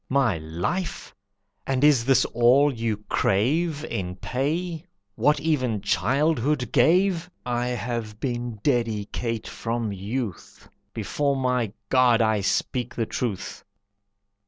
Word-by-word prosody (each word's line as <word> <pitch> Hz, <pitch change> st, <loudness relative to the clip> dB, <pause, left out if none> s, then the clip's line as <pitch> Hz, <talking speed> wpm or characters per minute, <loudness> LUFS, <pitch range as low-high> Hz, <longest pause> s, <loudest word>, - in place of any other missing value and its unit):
"My 130 Hz, -10 st, +2 dB
life! 85 Hz, -, -3 dB, 0.5 s
And 135 Hz, 0 st, 0 dB
is 140 Hz, -6 st, +5 dB
that 130 Hz, -1 st, +4 dB
all 130 Hz, +5 st, +5 dB
you 115 Hz, -3 st, -2 dB
crave 150 Hz, -, +1 dB
In 90 Hz, -, -4 dB
pay? 155 Hz, -, -2 dB, 0.3 s
What 150 Hz, +7 st, +2 dB
even 130 Hz, -8 st, 0 dB
childhood 140 Hz, -1 st, +1 dB
gave! 175 Hz, +6 st, +3 dB, 0.2 s
I 120 Hz, 0 st, -1 dB
have 115 Hz, -3 st, -4 dB
been 120 Hz, -3 st, -3 dB
dedicate 115 Hz, -2 st, -1 dB
from 115 Hz, -2 st, -3 dB
youth. 100 Hz, +1 st, -5 dB, 0.2 s
Before 140 Hz, -1 st, -1 dB
my 125 Hz, -5 st, 0 dB, 0.2 s
God 125 Hz, -3 st, +4 dB
I 110 Hz, -2 st, +2 dB
speak 120 Hz, +5 st, -1 dB
the 115 Hz, -, 0 dB
truth!" 110 Hz, -4 st, -4 dB
125 Hz, 110 wpm, -25 LUFS, 115-145 Hz, 0.5 s, is